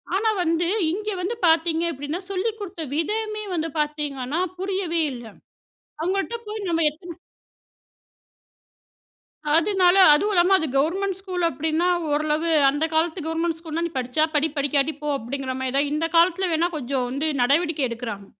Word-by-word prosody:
ஆனா, 435 +3 +2
வந்து 335 0 +1 0.2
இங்க 420 +4 -3
வந்து 390 +6 -2
பாத்தீங்க 325 0 +2
அப்டீன்னா, 290 +4 -5
சொல்லிக் 415 +4 -2
குடுத்த 375 -5 -6
விதமே 425 +6 -2
வந்து 325 -1 -1
பாத்தீங்கன்னா, 295 -1 -2 0.2
புரியவே 375 -3 -1
இல்ல. 240 -1 -9 0.8
அவுங்கள்ட்ட 390 +6 -1
போய் 425 -1 -5
நம்ம 330 -1 +1
எத்தன 340 +3 -11 2.4
அதுனால 365 0 +3 0.2
அதுவும் 410 +8 +1
இல்லாம 365 +1 +5
அது 315 - -1
கவர்மெண்ட் 370 +6 0
ஸ்கூல் 370 -2 -4
அப்டீன்னா, 320 +1 0 0.2
ஓரளவு 305 +2 0 0.2
அந்த 290 +3 0
காலத்து 320 +2 +1
கவர்மெண்ட் 325 0 -1
ஸ்கூல்னா, 330 0 -4
"நீ 340 - -4
படிச்சா 255 +4 0
படி 300 +1 +3
படிக்காட்டி 285 +1 +1
போ" 300 - -6
அப்படிங்கிற 260 +2 -4
மாரி 260 -1 -2
தான். 285 +1 +2
இந்த 305 +2 0
காலத்தில 360 +2 +4
வேணா 330 +2 +2
கொஞ்சம் 265 -2 -2
வந்து 275 +5 -2
நடவடிக்கை 295 +4 +2
எடுக்குறாங்க. 230 -4 -6
325 Hz, 145 wpm, -23 LUFS, 290-365 Hz, 2.4 s, இல்லாம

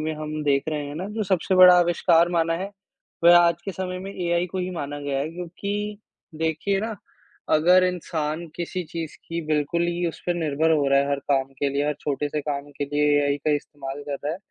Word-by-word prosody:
में 155 +1 -2
हम 155 0 -4
देख 140 -1 +2
रहे 150 -2 -2
हैं 145 - -7
ना 185 +4 -4
जो 220 - 0
सबसे 190 0 +1
बड़ा 180 -1 +9
आविष्कार 170 0 +3
माना 165 -1 +1
है, 195 +3 -5 0.5
वह 175 +1 +9
आज 170 -1 +3
के 195 - -4
समय 185 +1 -4
में 195 +1 -7
एआई 175 0 0
को 185 +2 -5
ही 185 0 -2
माना 145 -4 -5
गया 140 -1 -2
है 150 - -3
क्योंकि 200 +4 -4 0.4
देखिए 160 +5 0
ना, 220 0 -4 0.5
अगर 180 +4 +5
इंसान 170 -2 -2
किसी 180 +1 -3
चीज़ 165 -2 -5
की 165 0 -2
बिल्कुल 155 +2 0
ही 175 0 -1
उस 165 - -9
पे 175 - +1
निर्भर 155 +1 +1
हो 145 -3 +2
रहा 140 0 +4
है 140 - -1
हर 140 - +1
काम 135 -1 +2
के 140 - +1
लिए, 140 +1 0
हर 150 - 0
छोटे 145 0 -2
से 150 +1 -2
काम 145 0 -4
के 145 - 0
लिए 145 +1 0 0.2
एआई 145 0 +1
का 155 - -1
इस्तेमाल 145 -1 -8
करता 145 0 -4
है, - - -4
160 Hz, 225 wpm, -24 LUFS, 145-180 Hz, 0.5 s, बड़ा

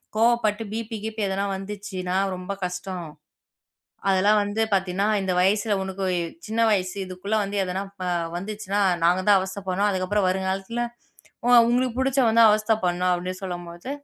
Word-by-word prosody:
கோபப்பட்டு 225 -1 +2
பீபி, 225 0 -4
கிபி 220 0 -4
எதனா 195 +1 -1
வந்துச்சுன்னா 195 -2 -5 0.2
ரொம்ப 185 +2 -5
கஷ்டம். 180 0 -5 1.0
அதெல்லாம் 200 +3 +4
வந்து 205 +2 -2
பாத்தீன்னா, 190 0 +1 0.2
இந்த 190 -1 -1
வயசுல 205 +3 +2
உனக்குச் 185 -3 -2
சின்ன 220 +1 -1
வயசு. 185 -3 0
இதுக்குள்ள 185 +3 -3
வந்து 200 +1 -4
எதனா 185 +1 -3 0.2
ப - - -4 0.3
வந்துச்சுன்னா 205 +1 -3 0.2
நாங்க 175 +2 +4
தான் 205 -1 +7
அவஸ்தை 190 +1 -5
படணும். 195 +3 +1
அதுக்கப்புறம் 190 +1 0
வரும் 190 +1 -1
காலத்துல 195 +5 -3 0.6
உ - - +1 0.2
உங்களுக்குப் 245 0 +1
புடிச்சா 270 0 +2
வந்து 230 +1 +5
அவஸ்த 215 +1 +3
படணும் 180 0 +1
அப்படின்னு 180 +1 -4
சொல்லும்போது 175 +2 -6
195 Hz, 150 wpm, -24 LUFS, 185-215 Hz, 1.0 s, தான்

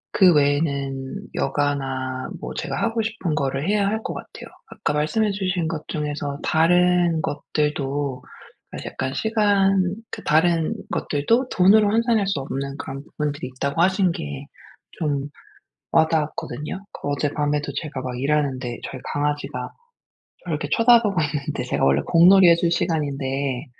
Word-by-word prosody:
그 185 -3 +7
외에는 140 +2 0
여가나 135 -3 -2
뭐 - - -6
제가 - - -3
하고 225 0 0
싶은 215 -7 -2
거를 140 +1 -1
해야 205 -1 +2
할 220 +2 -1
것 - - -3
같아요. - - -9 0.2
아까 215 -9 -3
말씀해 200 +9 +1
주신 185 -4 -1
것 160 -2 -5
중에서 145 -1 -3
다른 175 0 +3
것들도 145 -2 -2 0.5
아 - - -5
약간 130 0 -3
시간 195 -2 +2 0.2
그 - - -7
다른 160 +1 +2 0.2
것들도 230 - 0
돈으로 205 +3 +5
환산할 225 -1 +2
수 195 -7 0
없는 140 +1 -4
그런 135 -1 -6
부분들이 145 -3 -4
있다고 140 +5 -1
하신 185 0 +3
게 70 - -6 0.5
좀 145 -3 -2 0.6
와 160 - +6
닿았거든요. 155 +4 -3
그 - - -7
어젯밤에도 145 0 -1
제가 145 -5 -4
막 125 -1 -5
일하는데 135 -4 -1
저희 130 - -8
강아지가 145 -3 -2 0.7
저를 - - -2
이렇게 - - -4
쳐다보고 230 -3 +5
있는데 145 -2 -3
제가 125 - 0
원래 70 +1 +3
공놀이 180 +2 +7
해 170 - +7
줄 170 0 +1
시간인데 140 -5 -1
150 Hz, 310 characters per minute, -23 LUFS, 140-185 Hz, 0.7 s, 그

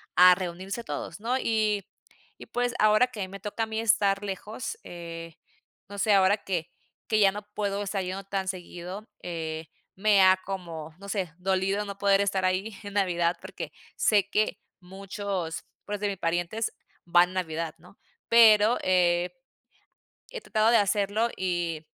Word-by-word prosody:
a 180 0 +8
reunirse 185 +5 -5
todos, 155 +1 -5
¿no? 240 +4 0
Y 215 -5 0 0.5
y - - -11
pues, 245 0 -1
ahora 215 +3 +5
que 210 -6 -5
me 195 +1 -8
toca 210 +3 -3
a - - +1
mí 220 0 -3
estar 200 -3 +3
lejos, 205 +4 -5
eh, 165 -1 -8 0.5
no 200 - -8
sé, 205 +1 +3
ahora 195 +1 +5
que 175 -4 -3 0.4
que 215 - +2
ya 200 -2 +6
no 210 +2 -7
puedo 205 -1 -1
estar 195 -1 -2
yendo 185 +2 -4
tan 195 -1 -3
seguido, 185 +2 -6
eh, 160 -2 -5 0.3
me 200 0 +4
ha 185 0 +6
como, 165 -5 -6
no 200 - -10
sé, 195 -4 -2
dolido 190 +2 0
no 200 -1 -7
poder 200 -1 +4
estar 195 -2 +1
ahí 190 +4 0
en 205 -1 -7
Navidad, 175 -3 +1
porque - - -7 0.2
sé 205 -2 +3
que 215 0 +1 0.2
muchos, 190 -2 -5 0.2
pues, 205 0 -4
de 205 - 0
mis 200 -1 -3
parientes 175 +6 -1 0.3
van 175 +1 +5
en - - -10
Navidad, 165 -3 -3
¿no? 180 +4 -19 0.3
Pero, 225 0 +6
eh 180 -1 +2 1.0
eh, - - -6
tratado 220 0 +2
de 235 - +6
hacerlo, 205 +2 +2
y- 175 -3 -2
195 Hz, 165 wpm, -27 LUFS, 180-210 Hz, 1.0 s, a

